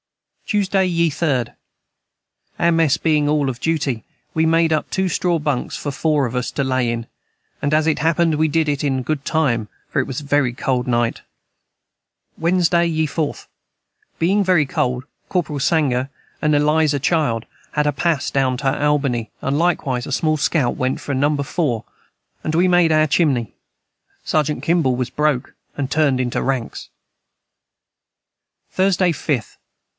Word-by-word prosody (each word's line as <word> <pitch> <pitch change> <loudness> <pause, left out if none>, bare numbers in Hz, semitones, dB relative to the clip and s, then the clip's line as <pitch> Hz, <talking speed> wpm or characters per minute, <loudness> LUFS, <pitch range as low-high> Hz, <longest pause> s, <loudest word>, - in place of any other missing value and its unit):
Tuesday 200 -4 +1
ye 170 -2 +2
3rd. 140 -6 -1 1.0
Our 170 - +3
mes 165 -4 +3
being 150 -2 +1
all 150 -2 +1
of 125 -2 -6
duty 145 -8 -1 0.3
we 160 0 +2
made 165 0 +3
us 155 - +3
up - - -16
2 190 0 0
Straw 175 -1 0
bunks 145 -4 -2
for 145 - -4
4 150 0 +1
of 120 +1 -4
us 125 0 -2
to 140 - -1
lay 130 -2 0
in 115 -1 -4 0.5
and 145 +1 0
as 155 0 +3
it 155 - +1
hapened 165 +1 +2
we 155 +1 +2
did 160 +1 +1
it 145 -1 -1
in 135 -2 0
a - - -4
good 140 +2 -2
time 120 -10 0 0.2
for - - 0
it - - -5
was 130 - -4
a 150 - -10
very 140 -3 +2
cold 125 0 -1
night. 120 -1 0 1.2
Wednesday 170 0 +2
ye 160 -2 0
4th. 150 0 -3 0.7
Being 195 +5 +2
very 180 -5 +3
cold 125 -1 -1 0.2
Corperal 155 -6 -1
Sanger 135 -4 +1 0.2
& - - -35
Eliezer 150 0 +3
Child 130 -7 0 0.3
had 150 0 +1
a 145 - +1
pas 165 -6 0
down 130 -2 +1
to 135 +1 -1
Albany 140 -6 +1
& - - -40
Likewise 140 -4 0
a - - -6
small 155 +3 +1
scout 145 -4 +1
went 130 +1 -1
for 140 - -4
Number 145 +2 +1
four 135 -7 -1 0.4
& 155 - -7
we 175 +3 +3
made 175 -2 +4
our 155 0 +4
chimney 135 -7 +1 0.7
serjant 150 -1 0
Kimbal 165 -7 +2
was 125 -1 -2
broke 150 -3 0 0.2
and 140 -2 -2
turned 140 -3 +2
into 125 -1 -1
the - - -2
ranks. 130 -3 -3 1.8
Thursday 185 -2 +2
5th. 140 -7 -2
150 Hz, 165 wpm, -20 LUFS, 130-165 Hz, 1.8 s, made